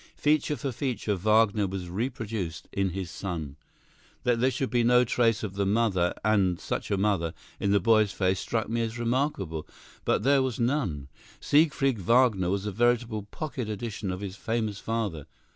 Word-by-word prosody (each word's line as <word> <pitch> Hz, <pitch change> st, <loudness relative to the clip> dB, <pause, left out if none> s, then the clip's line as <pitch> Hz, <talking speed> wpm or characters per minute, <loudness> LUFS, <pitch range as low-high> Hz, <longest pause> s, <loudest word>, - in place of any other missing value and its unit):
Feature 150 Hz, 0 st, +2 dB
for 140 Hz, -2 st, -3 dB
feature, 115 Hz, -4 st, -2 dB
Wagner 105 Hz, +1 st, +3 dB
was 95 Hz, -1 st, -5 dB
reproduced 110 Hz, -4 st, -4 dB
in 95 Hz, -1 st, +1 dB
his 90 Hz, -1 st, -5 dB
son. 80 Hz, -9 st, -5 dB, 0.7 s
That 120 Hz, -1 st, +2 dB
there 130 Hz, +2 st, +3 dB
should 130 Hz, +1 st, -2 dB
be 120 Hz, -1 st, +2 dB
no 125 Hz, +1 st, +5 dB
trace 115 Hz, -2 st, +1 dB
of 100 Hz, -3 st, -4 dB
the 100 Hz, 0 st, -1 dB
mother, 100 Hz, -5 st, +2 dB
and 95 Hz, -5 st, +2 dB
such -, -, -4 dB
a 100 Hz, -, +1 dB
mother, 95 Hz, -5 st, 0 dB, 0.2 s
in 100 Hz, -, +1 dB
the 100 Hz, -, +4 dB
boy's 110 Hz, 0 st, +4 dB
face 95 Hz, -2 st, 0 dB
struck 110 Hz, -2 st, -2 dB
me 115 Hz, +1 st, -1 dB
as 115 Hz, 0 st, -3 dB
remarkable; 120 Hz, -, -1 dB, 0.4 s
but -, -, +1 dB
there 140 Hz, 0 st, +4 dB
was 130 Hz, -4 st, -2 dB
none. 115 Hz, -, 0 dB, 0.3 s
Siegfried 140 Hz, -5 st, +2 dB
Wagner 110 Hz, -3 st, +3 dB
was 100 Hz, +1 st, -1 dB
a 105 Hz, -, -2 dB
veritable 115 Hz, -1 st, +1 dB
pocket 130 Hz, -6 st, -4 dB
edition 105 Hz, -2 st, -4 dB
of 90 Hz, +1 st, -5 dB
his 95 Hz, -2 st, -5 dB
famous 110 Hz, -3 st, -2 dB
father. 105 Hz, -10 st, -3 dB
110 Hz, 175 wpm, -27 LUFS, 95-120 Hz, 0.7 s, no